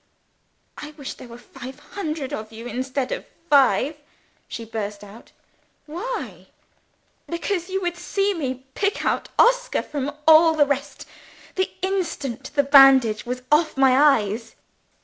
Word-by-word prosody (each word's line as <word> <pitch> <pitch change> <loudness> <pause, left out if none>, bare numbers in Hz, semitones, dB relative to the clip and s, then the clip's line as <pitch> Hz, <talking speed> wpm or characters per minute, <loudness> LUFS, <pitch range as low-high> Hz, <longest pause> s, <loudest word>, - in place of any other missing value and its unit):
"I 300 0 -8
wish 280 -3 -6
there - - -12
were 235 0 -11
five 245 +2 -11
hundred 305 -3 -5
of 220 -5 -6
you, 225 +1 -10
instead 255 +2 -3
of - - -3 0.3
five?" 280 +1 +4 0.5
she 230 - -7
burst 210 -2 -5
out. 205 +3 -14 0.5
"Why?" 300 - -6 0.8
"Because 350 +1 -3
you 385 +1 -2
would 350 -1 -2
see 395 +3 -1
me 260 -6 -4
pick 400 0 -1
out - - -1
Oscar - - +3
from 285 -1 -4 0.2
all 320 0 +7
the 295 -2 +4
rest, 280 0 -4 0.5
the 375 0 -1
instant 335 - -3
the 285 - +4
bandage 270 -6 +6
was 250 +1 -4
off 305 -1 +3
my 265 -1 +5
eyes!" 230 -6 +2
280 Hz, 140 wpm, -23 LUFS, 245-335 Hz, 0.8 s, all